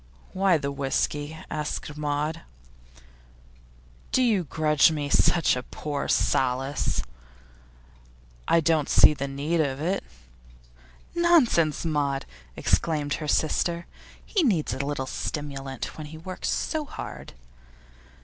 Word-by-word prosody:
'Why 190 -2 +3
the 140 -2 -3
whisky?' 145 +2 -1
asked 150 -1 -4
Maud. 150 +2 -2 1.7
'Do 260 - +3
you 210 -8 +2
grudge 150 -1 +3
me 145 -2 -2
such 170 -1 +4
poor 145 -2 -4
solace?' 130 - +1 1.4
'I 165 - +4
don't 160 -2 +2
see - - +7
the 140 -1 -4
need 145 +5 0
of 135 -3 -1
it.' 180 +6 -1 1.1
'Nonsense, 270 - +3
Maud!' 145 -3 0 0.3
exclaimed 150 -3 0
her 155 - -4
sister. 170 +3 +1 0.4
'He 405 - +1
needs 195 - +1
a 130 +2 -2
little 140 -1 -2
stimulant 135 -1 -5
when 155 - -6
he 160 +1 -10
works 185 +3 -5
so 315 -1 -1
hard. - - -8
150 Hz, 110 wpm, -26 LUFS, 140-170 Hz, 1.7 s, see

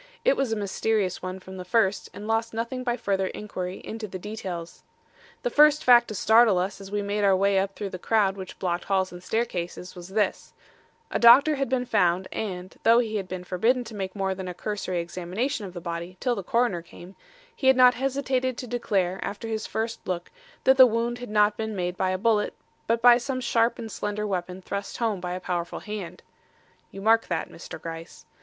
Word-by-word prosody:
It - - +5
was 270 -4 -1
a - - +1
mysterious 205 -1 -1
one 185 +1 -5
from 190 0 -10
the 180 - -6
first, 195 +1 +1
and 210 - -8
lost 225 0 0
nothing 235 +3 -3
by 240 -1 -1
further 195 -3 0
inquiry 185 -3 -5
into 220 -1 -5
the 185 - -6
details. 185 -4 -6 0.6
"The - - 0
first 300 0 +5
fact 240 -1 +7
to 215 - -6
startle 220 -1 +5
us 190 +3 -2
as 195 - -9
we 205 0 -2
made 205 +1 -1
our 195 -1 +5
way 195 +1 +3
up 195 0 -2
through 200 -2 -5
the 185 - -6
crowd 200 -1 +2
which 190 -2 -8
blocked 175 -2 -2
halls 190 -1 +1
and 175 0 -10
staircases 180 -5 -3
was 175 -1 -10
this: 210 +1 -1 0.6
A - - 0
doctor 270 +6 +8
had 275 -3 -1
been 250 -1 0
found 180 -4 +2
and, 185 -3 -5
though 230 +1 +5
he 220 -3 +1
had 195 -2 -4
been 185 0 -6
forbidden 225 +8 +1
to 225 -1 -10
make 190 -1 -4
more 195 -1 -1
than 190 0 -6
a 180 - -5
cursory 195 -2 -3
examination 185 +7 -3
of 180 - -11
the 175 - -6
body 170 +1 -6
till 250 -2 +1
the 205 - -3
coroner 215 -2 +1
came, 175 +2 -13 0.4
he 265 - -1
had 265 -1 +6
not 250 -1 +7
hesitated 260 -1 -1
to - - -5
declare 195 -6 -1
after 205 +3 -5
his 220 -1 -3
first 225 +1 -4
look, 175 -1 -3 0.3
that 265 0 +5
the 260 -1 +10
wound 235 +1 -1
had 245 - -7
not 210 0 +3
been 220 -1 -3
made 180 -1 -2
by 185 0 0
a 185 - 0
bullet 215 +1 +1 0.3
but 230 0 +1
by 245 0 +8
some 255 +1 -3
sharp 235 -2 +1
and 225 -1 -7
slender 205 +1 -3
weapon 185 -1 -3
thrust 200 +1 -5
home 220 -6 -1
by 180 0 -3
a 180 - -3
powerful 175 -2 -3
hand. 210 -4 -7 0.7
(You 195 - -9
mark 225 +2 +4
that, - - -2
Mr. 165 - -9
Gryce.) 165 +1 -8
205 Hz, 215 wpm, -26 LUFS, 185-230 Hz, 0.7 s, the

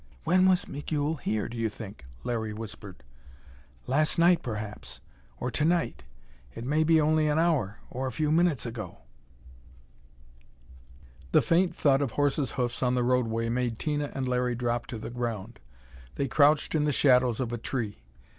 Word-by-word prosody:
"When 185 +1 +4
was 185 -1 +2
Migul 145 +2 -2
here, 110 -5 -2
do 120 - -8
you 115 -1 0
think?" 105 - -10 0.2
Larry 110 -3 -2
whispered. 105 -6 -8 0.8
"Last 155 +6 +1
night, 170 0 +5
perhaps. 105 -5 -6 0.4
Or 125 - -2
to 150 - -1
night. 165 - 0 0.5
It 115 - -6
may 150 +4 +2
be 160 0 +4
only 155 0 +3
an 150 0 +1
hour 155 - +1
or 130 +1 -3
a - - -3
few 150 +1 0
minutes 165 -5 +2
ago." 110 -6 -7 2.3
The - - +6
faint 175 +2 +2
thud 140 -1 +3
of 135 -5 -1
horses' 145 -3 0
hoofs 125 -2 -1
on 125 -1 +2
the 125 - +1
roadway 115 -2 +1
made 120 -1 -1
Tina 145 0 -1
and 135 -1 -2
Larry 125 -1 0
drop 120 -1 -2
to 125 -2 -5
the 110 - -7
ground. 115 -2 -4 0.6
They 140 - -1
crouched 145 +4 +3
in 150 -2 +2
the 150 - +2
shadows 125 -4 +3
of 120 -2 -2
a 120 - -3
tree. 115 - -4
125 Hz, 165 wpm, -28 LUFS, 115-150 Hz, 2.3 s, The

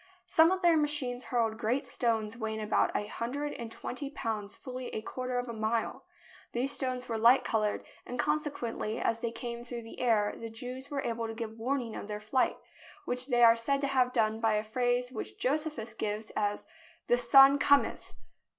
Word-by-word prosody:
Some 325 +1 +5
of 375 0 -1
their 340 -2 +6
machines 290 -5 -1
hurled 225 -2 0
great 250 +5 0
stones 225 -3 -1
weighing 220 -1 -3
about 215 0 +2
a 210 - 0
hundred 265 +7 -3
and 230 -1 -7
twenty 275 +4 -5
pounds 215 -7 -3
fully 255 -1 -7
a 215 - -2
quarter 255 +1 -3
of 245 0 -2
a 235 - -5
mile. 220 +1 -2 0.5
These 255 +3 +1
stones 255 -2 -2
were 225 -1 -2
light 235 +4 +6
coloured, 215 -2 0 0.2
and 250 - -6
consequently 275 -6 -1
as 230 - 0
they 235 0 -2
came 235 0 -5
through 240 -1 -6
the 225 - -10
air 220 -4 +2
the 230 - -7
Jews 250 +4 -7
were 280 -1 -2
able 230 -1 -2
to 225 - -6
give 225 -1 -6
warning 245 -1 -2
of - - -6
their 210 0 -4
flight, 215 +5 +1 0.5
which 250 +1 0
they 240 -3 +3
are 230 0 +8
said 275 +5 0
to 280 - +1
have 255 -2 +3
done 220 -2 +1
by 225 -1 +2
a 210 - 0
phrase 245 +2 0
which 230 - -6
Josephus 290 -4 -1
gives 215 +1 -4
as 205 -1 -1 0.4
"The 240 - +3
son 270 +3 +7
cometh!" 285 -1 +2
240 Hz, 195 wpm, -30 LUFS, 225-260 Hz, 0.5 s, are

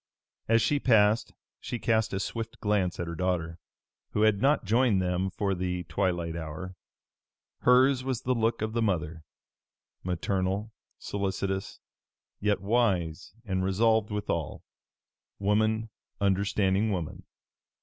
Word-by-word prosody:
As 115 -1 +4
she 145 +4 +2
passed 110 -3 +3 0.3
she 120 - -4
cast 110 -1 +1
a 95 - -2
swift 115 +2 -4
glance 100 -4 0
at 85 - -1
her 85 - -5
daughter, 85 -1 -2 0.5
who 105 - +2
had 110 -2 +3
not 140 -3 +3
joined 115 0 +3
them 90 +1 0
for 100 +1 -1
the 90 -1 -2
twilight 85 -3 -1
hour. 85 +3 -6 0.8
Hers 130 +1 +4
was 130 -3 -2
the 130 - +1
look 115 -1 0
of 110 0 -2
the 115 - 0
mother 85 -6 -1 0.8
maternal, 95 +4 -1 0.2
solicitious, 95 -1 -3 0.6
yet 105 0 +1
wise 100 -6 0
and 95 -3 -1
resolved 110 +3 +2
withal; 105 -6 -3 0.7
woman 110 +2 +1 0.3
understanding 100 +1 +1
woman. 85 -5 -4
100 Hz, 125 wpm, -28 LUFS, 90-110 Hz, 0.8 s, As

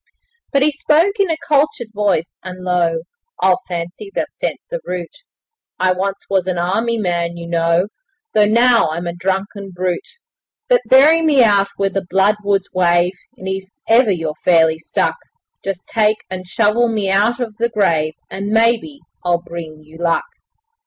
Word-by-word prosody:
But 275 -1 +3
he 305 - +3
spoke 325 +8 +2
in 390 -2 +2
a 325 - 0
cultured 280 -6 +1
voice 205 -5 -1
and 185 -1 -8
low 170 -2 +1 0.4
'I 190 -1 +5
fancy 175 - -5
they've - - 0
"sent - - -4
the - - -2
route"; 180 -2 -5 0.6
I 185 0 +3
once 195 +2 -2
was 190 -2 0
an 185 -1 -1
army 225 +7 0
man, 170 -4 -1
you 170 - -7
know, 170 +1 +1 0.5
Though 210 -1 +4
now 235 -3 +4
I'm 170 +3 -4
a 170 - -3
drunken 195 +3 -3
brute; 185 - -4 0.5
But - - +4
bury 300 +5 +6
me 295 -5 +4
out 200 -3 +4
where 195 -1 0
the 195 - -1
bloodwoods 200 0 +1
wave, 175 0 +2 0.2
And 190 - -8
if 190 0 -4 0.2
ever 230 0 +5
you're 165 -5 -1
fairly 160 -2 +4
stuck, 165 - -1 0.5
Just 195 -2 -4
take 215 -1 +2
and 185 -1 -6
shovel 215 +6 +2
me 210 -4 -1
out 210 +5 +2
of 230 -4 -4
the 235 +1 +1
grave 160 -8 +1
And, 195 +1 -5
maybe, 230 +6 +1 0.2
I'll 175 -1 0
bring 160 -3 -8
you 155 +2 -15
luck. 170 -1 +1
195 Hz, 165 wpm, -18 LUFS, 175-230 Hz, 0.6 s, bury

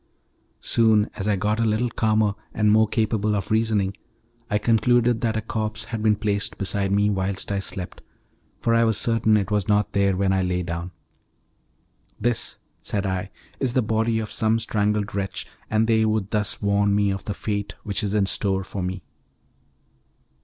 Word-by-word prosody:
Soon, 110 -2 +3
as 100 0 -4
I 105 - +3
got 105 +3 0
a - - +2
little 115 +2 +1
calmer 110 -2 +2 0.2
and 105 -1 +3
more 110 +1 +5
capable 110 -1 0
of 100 -1 -3
reasoning, 110 -3 +1 0.5
I 105 - +2
concluded 115 +1 +2
that 110 -2 0
a - - -1
corpse 110 +1 -3
had 110 0 -5
been 105 -1 +3
placed 105 0 -1
beside 100 -1 -1
me 105 +1 +3
whilst 95 0 -2
I 100 - 0
slept, 95 -2 -5 0.6
for 115 - 0
I 115 0 +4
was 110 -3 +2
certain 110 -2 +3
it 105 0 -2
was 105 -2 +1
not 105 0 +1
there 100 -2 +2
when 95 0 +2
I 95 - +2
lay 90 -1 -1
down. 85 +1 -4 1.3
"This," 120 -1 -1 0.2
said 100 -1 -3
I, 95 0 -2 0.3
"is 130 -3 0
the 130 - +2
body 110 +1 +1
of 110 -1 -3
some 110 0 +2
strangled 105 -2 0
wretch, 100 -1 -3 0.2
and 110 +1 +2
they 110 -1 +3
would 110 -2 0
thus 105 -1 -1
warn 100 0 +2
me 100 -1 +2
of 95 0 -5
the 105 - -3
fate 100 -1 -3
which 100 +1 -1
is 105 0 -1
in 105 -2 +3
store 95 0 -1
for 95 +1 -5
me." 90 -1 -4
105 Hz, 180 wpm, -24 LUFS, 100-110 Hz, 1.3 s, more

